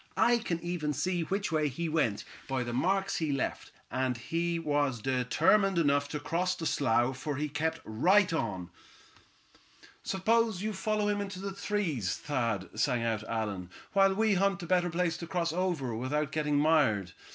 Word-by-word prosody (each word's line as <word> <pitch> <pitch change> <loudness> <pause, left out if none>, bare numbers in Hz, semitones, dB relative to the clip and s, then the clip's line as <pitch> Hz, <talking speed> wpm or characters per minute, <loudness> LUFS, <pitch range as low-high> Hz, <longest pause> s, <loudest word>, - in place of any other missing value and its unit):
I 240 0 +4
can 175 -7 -2
even 170 -4 -2
see 175 +5 -1
which 195 +3 -2
way 155 -2 +2
he 165 +5 -3
went, 150 -10 0 0.2
by 135 -2 -1
the 120 0 -4
marks 190 +9 +1
he 155 -3 -1
left; 135 -2 -2 0.2
and 130 -1 0
he 170 +7 -1
was 145 -6 0
determined 155 - +2
enough 145 -3 +2
to 150 - -3
cross 180 +5 -1
the 165 - -5
slough, 130 -3 +2
for 145 +1 -3
he 150 +3 -1
kept 160 +3 -2
right 180 - +3
on." 95 - -3 1.3
"Suppose 220 0 +1
you 215 0 -1
follow 210 +2 0
him 205 0 0
in 200 - -3
the 195 0 -6
trees, 190 - -1
Thad," 115 -9 -2
sang 120 +1 +1
out 110 -2 -1
Allan, 105 -5 -3 0.2
"while 195 -1 +4
we 220 0 +3
hunt 195 0 +1
a - - -4
better 180 0 +2
place 170 0 0
to 170 - -7
cross 170 -2 -1
over 170 -9 -1
without 140 +5 -1
getting 150 -1 0
mired. 145 - +3
160 Hz, 175 wpm, -30 LUFS, 130-185 Hz, 1.3 s, I